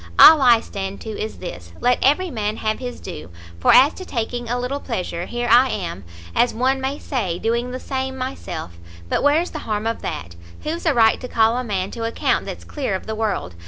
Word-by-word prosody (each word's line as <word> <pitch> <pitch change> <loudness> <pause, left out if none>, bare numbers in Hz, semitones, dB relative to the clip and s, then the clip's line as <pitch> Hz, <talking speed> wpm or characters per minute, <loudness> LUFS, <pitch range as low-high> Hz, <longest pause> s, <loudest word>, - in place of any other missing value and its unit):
All 315 -2 +10
I 240 -3 +6
stand 195 -2 -5
to 220 - -6
is 215 +1 -5
this, 85 - -8
let 245 0 +2
every 325 +6 +3
man 215 -3 -2
have 215 0 -1
his 250 -1 -6
due; 75 +2 -8 0.3
for - - +4
as 275 +4 +7
to 375 - -8
taking 240 -4 -3
a 245 +1 0
little 255 +3 -2
pleasure, 180 -9 -4
here 240 0 -3
I 245 +3 +6
am, 170 - -4 0.3
as 240 - +3
one 260 +3 +1
may 270 +2 -2
say, 200 - -2
doing 235 +5 -1
the 255 +1 -5
same 265 0 -3
myself; 255 - -6 0.3
but - - +1
where's 310 +5 +2
the 310 - -5
harm 210 0 -1
of 230 0 -2
that? 85 +1 -5 0.3
who's 330 +2 -3
a 315 - +4
right 225 -2 +4
to 250 - -5
call 225 -1 +3
a 250 - -1
man 195 -5 -2
to 230 - -5
account 230 0 0
that's - - -7
clear 265 -10 -3
of 185 - -5
the 220 - -4
world? 215 - -2
235 Hz, 220 wpm, -21 LUFS, 210-260 Hz, 0.3 s, All